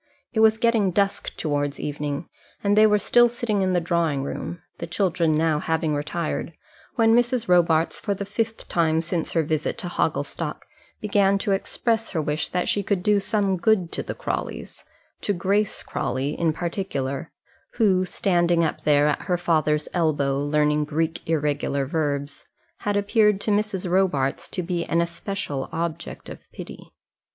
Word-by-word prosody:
It 220 - 0
was 220 0 +5
getting 225 -4 +2
dusk 200 +2 -1
towards 145 -2 -1
evening, 145 +1 -3 0.4
and 205 0 +3
they 215 +1 +7
were 210 0 +4
still 240 +3 +4
sitting 230 -4 -1
in 185 -1 +1
the 180 - +3
drawing 165 -5 0
room, 165 +4 -5 0.2
the 170 - -4
children 170 -3 +1
now 160 -1 +2
having 160 -1 0
retired, 155 +3 -3 0.4
when 225 -1 +4
Mrs. 245 0 +1
Robarts 170 -2 +3
for 200 -2 -1
the 200 +1 -4
fifth 225 +2 -3
time 160 -2 +2
since 170 0 -2
her 165 - +2
visit 155 0 -1
to - - -5
Hogglestock - - -2 0.4
began 200 -1 +3
to 200 - -2
express 225 +3 0
her 170 - -2
wish 150 0 -1
that 180 0 -1
she 205 - +1
could 195 -2 -1
do 210 0 +4
some 200 -1 0
good 185 -2 +2
to - - -2
the - - -5
Crawleys, - - -5 0.4
to 205 - 0
Grace 200 +3 0
Crawley 135 +2 -2
in 165 0 +1
particular, 165 -4 -3 0.4
who, 195 -5 +3
standing 175 -3 +2
up 160 - -1
there 145 -1 +4
at 150 - 0
her 180 -2 +1
father's 155 -3 +1
elbow, 145 -5 +1
learning 150 +1 +1
Greek 160 +2 -1
irregular 145 -3 0
verbs, 145 -1 -2 0.3
had 205 0 -1
appeared 210 0 +3
to 215 - 0
Mrs. 205 -3 0
Robarts 175 -8 +1
to 180 - -3
be 170 -1 -1
an 165 - 0
especial 170 -5 -3
object 165 0 -4
of - - -8
pity. - - -10
175 Hz, 165 wpm, -24 LUFS, 155-200 Hz, 0.4 s, they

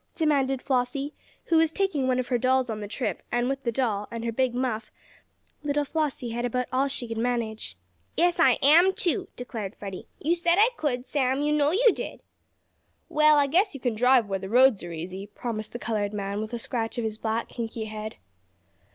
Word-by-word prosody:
demanded 275 -5 +1
Flossie, 270 +3 -1 0.3
who 330 - +3
was 320 -1 +4
taking 320 -9 0
one 255 -1 +2
of 255 -1 -2
her 245 -2 +1
dolls 255 -1 +2
on 215 - -4
the 205 - -5
trip, 225 +4 -3
and 240 0 +1
with 270 0 -2
the 235 - -1
doll, 215 -4 -1
and 230 0 -5
her 230 - 0
big 250 +1 0
muff, 245 -3 -2 0.7
little 290 0 0
Flossie 285 -6 -2
had 240 +1 -3
about 250 +1 0
all 265 +2 +2
she 260 -3 -5
could 225 -1 -4
manage. 225 - -2 0.4
"Yes, 350 +1 +3
I 325 - +5
am 340 +7 +6
too," 370 +2 -1
declared 225 -5 -6
Freddie. 195 -2 -8
"You 320 +4 +1
said 340 0 +2
I 435 +4 +6
could, 255 - -2
Sam; 270 0 0
you 300 0 +2
know 295 -1 +3
you 450 +8 +5
did!" - - -6 0.9
"Well 305 0 +5
I 285 - +5
guess 355 +5 +2
you - - -6
kin 245 -2 0
drive, 250 0 +4
where 195 -1 -2
the 190 0 -7
roads 250 -1 +5
are 175 - -6
easy," 185 +4 -6
promised 215 +1 -5
the - - -5
colored 215 -3 -2
man, 200 0 -3
with 220 +2 -6
a - - -1
scratch 230 -1 -3
of 235 - -1
his 220 -1 -3
black, 225 +1 -1
kinky 230 -1 -4
head. 215 0 -6
250 Hz, 210 wpm, -26 LUFS, 220-290 Hz, 0.9 s, am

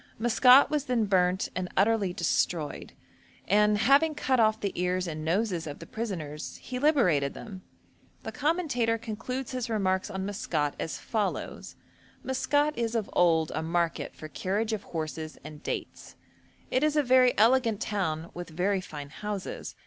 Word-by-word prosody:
Maskat 250 +5 +6
was 295 -2 0
then 245 -4 +1
burnt 185 -2 +2
and 180 -1 -2
utterly 205 -1 +3
destroyed; 170 -2 -1 0.5
and 210 +1 +4
'having 280 +8 +4
cut 260 -3 +1
off 220 -1 +3
the 200 - -2
ears 180 +1 -1
and 155 -2 -5
noses 175 0 0
of 145 - -6
the - - -10
prisoners 165 -10 -5
he 250 -1 -6
liberated 185 - +2
them.' 190 -4 -9 0.6
The - - -5
commentator 285 -8 0
concludes 230 +3 -5
his 255 -2 -3
remarks 190 -3 0
on 190 -2 -4
Maskat 165 -8 -1
as 165 - -3
follows: 215 -4 -3 0.5
'Maskat 290 +3 +1
is 230 0 -1
of 220 -3 -2
old 165 -3 +3
a - - -2
market 170 +1 -1
for 155 - -8
carriage 205 +8 -2
of 215 - -2
horses 155 -1 -5
and 155 0 -10
dates; - - -6 0.6
it 255 - +2
is 305 0 +2
a 300 - +3
very 255 -1 +4
elegant 230 -1 +4
town, 170 -6 -2
with 175 0 -7
very 185 +4 0
fine 150 -6 -8
houses. 205 +4 -6
205 Hz, 155 wpm, -28 LUFS, 175-245 Hz, 0.6 s, Maskat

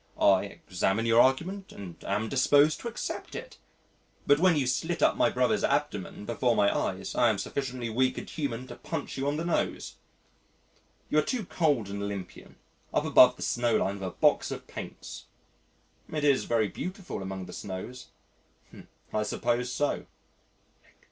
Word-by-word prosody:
I 95 0 +5
examine 95 +2 -1
your 115 +1 +6
argument 185 +9 +1
and 90 -4 -10
am 105 +3 -1
disposed 145 +4 +4
to - - -5
accept 235 - -5
it. - - -8 0.7
But 145 +1 +5
when 180 -1 +5
you 145 -3 +1
slit 160 +7 -1
up - - +4
my - - +3
brother's - - +1
abdomen 105 - -1
before 120 +1 +1
my 100 -2 +3
eyes, 95 +1 -2
I 120 - +4
am 110 - +1
sufficiently 125 +3 -3
weak 130 +3 +1
and - - -6
human 130 -5 -3
to 120 - -8
punch - - -5
you 135 +1 -2
on 145 +1 0
the 165 - -2
nose.... 170 - -1 1.1
You 150 - +5
are - - +5
too 235 - -2
cold 145 - +1
and 100 0 -5
Olympian, 100 -3 -6 0.4
up - - +1
above 125 0 +7
the - - -6
snowline 110 -4 +1
with 95 - -3
a - - -2
box - - +2
of - - -6
paints." - - -8 0.9
"It 155 -1 -2
is 140 -2 +3
very 115 -2 +2
beautiful 185 - -6
among 95 -1 -5
the 90 - -10
snows." 105 +7 -7 1.1
"I 110 - +1
suppose 120 +3 -1
so." 145 +3 -1
120 Hz, 165 wpm, -28 LUFS, 100-145 Hz, 1.1 s, above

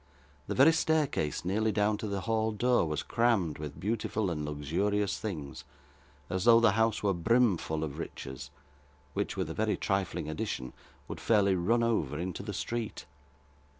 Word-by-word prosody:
The - - -2
very 145 +5 +7
staircase 150 - 0
nearly 110 +4 +1
down 105 0 +2
to 110 - -3
the 100 -1 -2
hall 110 0 0
door, 120 -3 +2
was 75 -1 -2
crammed 110 -11 +1
with 75 -2 -7
beautiful 105 -1 -1
and 75 -2 -3
luxurious 90 +8 -1
things, 80 -10 -5 0.6
as 90 0 -2
though 115 -1 +8
the 115 -2 +5
house 110 +1 +1
were 100 -1 +2
brimful 90 -5 +1
of 75 -3 -5
riches, 65 -1 -7 0.6
which, - - -2
with - - -1
a - - -4
very 110 -1 0
trifling 95 -5 -1
addition, 80 - -4 0.3
would - - -6
fairly 100 -3 +3
run 110 +7 +2
over 80 - 0
into 90 +2 -4
the 105 +1 -5
street. 115 +3 -4
100 Hz, 160 wpm, -30 LUFS, 80-115 Hz, 0.6 s, though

